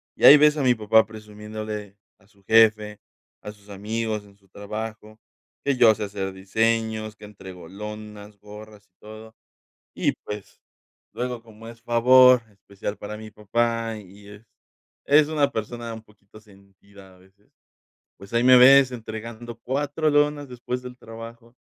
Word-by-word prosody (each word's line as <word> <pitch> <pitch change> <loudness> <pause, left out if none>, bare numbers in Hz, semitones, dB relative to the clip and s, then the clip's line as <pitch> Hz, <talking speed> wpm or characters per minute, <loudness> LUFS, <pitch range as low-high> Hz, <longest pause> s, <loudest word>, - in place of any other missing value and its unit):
y - - +1
ahí 145 - +11
ves 150 +1 +4
a 145 - -1
mi 125 -1 +4
papá 110 0 +3
presumiéndole 105 -1 -8 0.2
a 95 - -27
su 100 -2 -29
jefe, 105 -1 +3 0.4
a 105 - -8
sus 105 0 -21
amigos 105 +1 -4
en 100 -1 -20
su 100 -1 -31
trabajo, 110 +2 -8 0.5
que 140 -1 +1
yo 115 -3 +6
sé 105 - -5
hacer 100 -1 -5
diseños, 110 +2 -1
que 105 - -13
entrego 95 -4 -12
lonas, 105 0 -10
gorras 105 0 -14
y 90 - -51
todo 110 +1 -13 0.6
y - - 0
pues 105 -1 -10 0.5
luego, 125 -1 -4
como 115 0 -14
es 115 0 -14
favor 125 +1 +5
especial 100 +1 -8
para 105 +1 -8
mi 110 0 -11
papá 115 +2 -2
y 100 +1 -16
es 105 +2 -14 0.6
es 145 +1 +4
una 145 -3 +1
persona 115 +1 -5
un 110 -1 -10
poquito 105 -1 -20
sentida 100 -1 -19
a 90 - -23
veces, 95 +2 -27 0.7
pues, 100 +3 -14
ahí 115 0 +2
me 130 0 +7
ves 135 +1 +7
entregando 115 0 -8
4 145 +5 -2
lonas 145 -1 +1
después 125 0 -5
del 125 0 -10
trabajo 115 +1 -12
110 Hz, 160 wpm, -23 LUFS, 105-120 Hz, 0.7 s, ahí